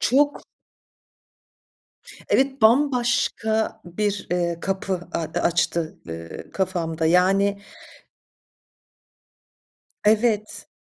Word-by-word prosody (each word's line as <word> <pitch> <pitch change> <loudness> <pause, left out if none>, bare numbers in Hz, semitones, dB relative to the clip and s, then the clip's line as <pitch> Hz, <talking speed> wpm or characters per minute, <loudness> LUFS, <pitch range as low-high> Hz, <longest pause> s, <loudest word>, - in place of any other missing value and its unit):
Çok. 285 +4 +2 1.9
Evet, 270 -2 +1
bambaşka 230 -3 +2
bir, 205 +3 -2
ııı, 170 -1 -1
kapı 190 -2 -3
a - - -1
açtı, 165 0 -1
ııı, 85 0 -8
kafamda. 165 -4 -1
Yani 195 +3 +3 2.4
Evet. 215 0 +1
195 Hz, 65 wpm, -23 LUFS, 175-220 Hz, 2.4 s, Yani